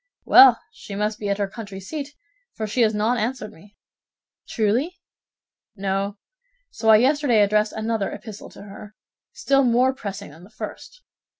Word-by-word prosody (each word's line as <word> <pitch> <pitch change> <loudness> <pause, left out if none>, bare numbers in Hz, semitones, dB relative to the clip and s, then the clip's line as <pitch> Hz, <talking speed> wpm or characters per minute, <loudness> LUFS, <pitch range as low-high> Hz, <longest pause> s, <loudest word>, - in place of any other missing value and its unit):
"Well, 260 -3 +7
she 200 - -10
must 210 +1 -2
be 205 - -4
at 200 - 0
her 200 -1 -1
country 200 -2 -9
seat, 290 +8 -7 0.4
for 220 - -3
she 215 +4 -1
has 220 -2 +3
not 225 +4 0
answered 230 0 -3
me." 205 +5 -19 0.7
"Truly?" 240 - -1 0.8
"No; 195 +1 -2 0.5
so 225 - -1
I 220 - +9
yesterday 255 -2 +3
addressed 210 +1 +1
another 220 -2 -2
epistle 215 -2 -9
to - - -13
her, 205 +1 -12 0.4
still 275 0 +1
more 250 +2 +3
pressing 200 - -7
than 160 +4 -16
the 190 - -15
first. - - -9
215 Hz, 160 wpm, -22 LUFS, 200-245 Hz, 0.8 s, I